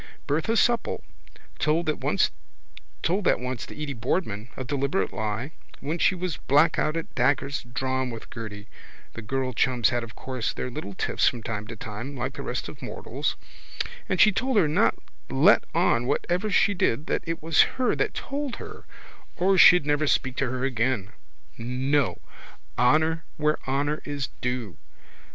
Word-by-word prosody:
Bertha 160 +11 +1
Supple 235 0 +1 0.6
told 160 +3 +2
that 155 - -1
once - - +2 0.7
to 130 - +1 0.2
Edy 150 -2 -4
Boardman, 115 - -2
a 130 - -3
deliberate 135 -6 -1
lie, 110 +6 -3 0.3
when 155 +5 -3
she 185 - +4
was 180 -4 -3
black 150 +4 +3
out 155 +2 +1
at 165 - -5
daggers 135 +3 +1
drawn 130 0 -1
with 115 -2 -8
Gerty 105 -3 -7 0.5
(the 115 - -7
girl 130 +3 -2
chums 120 -1 +2
had 120 -1 -1
of 115 -1 -10
course 130 -3 -3
their 125 - -4
little 120 -8 -6
tiffs - - +1
from 120 -2 0
time 105 -2 -4
to 115 - -7
time 115 +6 -6
like 125 +2 -2
the - - -7
rest - - -3
of - - -10
mortals) - - -3 0.7
and 185 - 0
she 215 - +7
told 255 +4 0
her 165 - +5
not 150 - +3 0.3
to - - -5
let - - +6
on 120 +1 +3
whatever 180 +9 0
she 200 +1 +4
did 150 -6 0
that - - -1
it 165 -1 -3
was 160 -1 +5 0.2
her 255 -2 +2
that - - -1
told 280 -2 -3
her - - -10 0.5
or 190 +2 +3
she'd 180 -4 +8
never 145 +1 +1
speak 130 -2 +1
to 135 - 0
her 130 +1 -3
again. 120 -5 0 0.5
No. 130 +4 0 0.6
Honour 160 +6 +3
where 150 0 +1
honour 145 +3 0
is 145 -3 -3
due. 125 -6 -3
135 Hz, 165 wpm, -26 LUFS, 120-160 Hz, 0.7 s, she'd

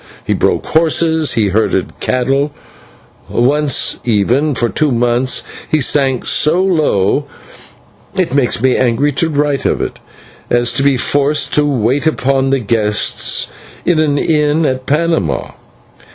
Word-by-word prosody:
He - - 0
broke - - 0
horses, 160 -1 +1
he 105 -3 +1
herded 110 +4 -1
cattle; 135 +3 0 0.8
once, 140 +3 +1
even, 125 +7 +1
for 120 0 +1
two 150 +4 0
months 120 +1 0 0.3
he 155 - +1
sank 135 -2 +1
so 155 +4 +2
low 145 - +1 0.9
it 185 -8 -1
makes 140 -3 +1
me 130 -1 +3
angry 130 +4 +1
to 160 +4 -1
write 145 -2 0
of - - 0
it - - -4 0.5
as 120 0 +1
to - - 0
be 140 -1 +2
forced 145 +2 0
to 150 0 +2
wait 135 +3 0
upon 135 -3 0
the 135 - +2
guests 105 -3 0 0.3
in 175 -3 +2
an 150 -2 +1
inn 150 0 +1
at 130 -2 -2
Panama. 150 - -1
140 Hz, 140 wpm, -14 LUFS, 120-150 Hz, 0.9 s, me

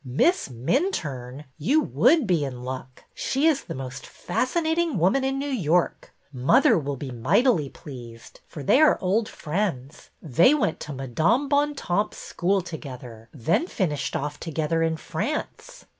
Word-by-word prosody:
Miss 145 - +1
Minturne! 135 - -2
You 275 - +3
would 295 0 +3
be 175 -6 +1
in 125 -3 -5
luck. 130 0 -7
She 275 +3 -1
is 315 -4 +2
the - - -6
most 130 -1 -7
fascinating 320 - -1
woman 190 +11 +2
in 270 0 0
New 275 - -2
York. 180 - 0 0.2
Mother 140 - +4
will 140 -1 -3
be 135 0 -6
mightily 150 - +2
pleased, 120 -7 -11
for 145 - -8
they 260 - +4
are 310 - +5
old 210 +4 0
friends. 155 -5 -4
They 170 - +4
went 255 - 0
to 150 - -6
Madame 160 - +1
Bontemps' 285 -9 0
school 190 +2 0
together, 125 -9 -9
then 160 - 0
finished 150 - -2
off 145 +1 -3
together 165 0 -1
in 160 0 +1
France." - - -5
165 Hz, 145 wpm, -25 LUFS, -, 0.2 s, are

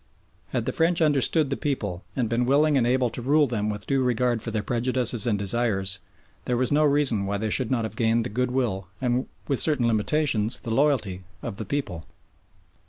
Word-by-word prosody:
Had - - -3
the - - -1
French 170 +1 +1
understood 150 -1 +2
the - - +1
people 105 - -3
and 125 -4 0
been 120 +2 0
willing 145 +3 +3
and 120 -3 +2
able 125 -1 +1
to 120 - -5
rule 145 +4 +3
them 110 -5 -2
with 105 -1 -5
due 135 -1 +1
regard 125 -2 0
for - - -2
their 110 -2 -2
prejudices 125 0 0
and 105 -3 +1
desires, 100 -2 0 0.5
there 125 - 0
was 125 0 0
no 150 +1 +3
reason 140 -9 +3
why 100 +1 -1
they 110 +1 -2
should 125 -1 0
not 120 -3 0
have 110 0 -5
gained 115 0 +1
the - - -3
goodwill, 125 -7 -1
and 125 0 -1 0.2
with 140 -3 +1
certain 145 -6 +3
limitations, 115 0 +1
the 115 - -5
loyalty 110 -8 +1 0.2
of 100 - -5
the - - -5
people. 100 - -4
120 Hz, 200 wpm, -25 LUFS, 110-135 Hz, 0.5 s, willing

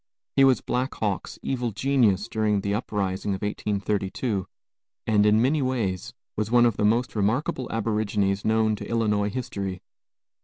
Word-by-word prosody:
He 135 - +6
was 135 -2 +5
Black 130 +2 -2
Hawk's 100 -4 -3
evil 125 -3 -1
genius 110 -3 +2
during 110 -3 0
the 100 0 -1
uprising 100 -3 -2
of 95 - -7
1832, 105 0 -2 0.6
and 105 -1 +3
in 105 +1 +5
many 145 +4 +2
ways 115 -9 -2 0.2
was 105 0 -1
one 120 0 +5
of 115 -3 +2
the - - 0
most 115 +4 +2
remarkable 115 +5 0
aborigines 105 -3 0
known 110 0 +2
to - - -8
Illinois 105 -3 +1
history. 100 -6 -4
105 Hz, 150 wpm, -25 LUFS, 100-120 Hz, 0.6 s, He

